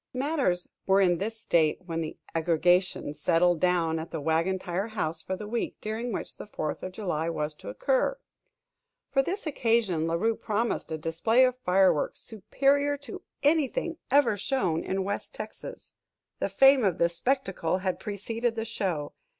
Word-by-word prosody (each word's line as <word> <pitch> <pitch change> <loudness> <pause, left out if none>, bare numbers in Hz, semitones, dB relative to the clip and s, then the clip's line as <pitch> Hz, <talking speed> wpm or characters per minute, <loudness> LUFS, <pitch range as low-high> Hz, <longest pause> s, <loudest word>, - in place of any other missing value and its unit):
Matters 260 - 0 0.2
were 195 0 +5
in 175 -3 +3
this 225 +3 -3
state 165 -6 +2
when 165 -1 -3
the 155 - -5 0.2
"aggregation" 175 0 +2
settled 170 +3 +2
down 170 -2 +2
at 160 - -6
the 165 - -4
Wagon 165 +5 +1
Tire 185 +3 -3
House 165 -7 -3
for 190 - -3
the 210 - -7
week 235 +2 -2
during 225 +3 -3
which - - -5
the - - -8
Fourth 155 -7 -4
of 185 - -6
July 170 -6 -2
was 150 -2 -2
to - - -10
occur. - - +1 0.9
For 270 - +4
this 370 +8 -3
occasion 225 - +1
La 165 - 0
Rue 225 +6 +1
promised 220 -5 -2
a 160 - -1
display 170 +11 +3
of 255 -1 0
fireworks 185 -7 +3
"superior 280 +7 +1
to 275 -5 -9 0.2
anything 315 +2 +1
ever 280 -5 +4
shown 195 - 0
in 190 0 -1
West 200 +1 -4
Texas." 215 0 -8 0.4
The - - 0
fame 270 -1 +6
of 190 -5 +2
this 170 0 +1
spectacle 195 -10 0
had 185 -1 -2
preceded 225 +4 -2
the 225 0 -2
show. 180 -9 -2
195 Hz, 165 wpm, -28 LUFS, 170-235 Hz, 0.9 s, fame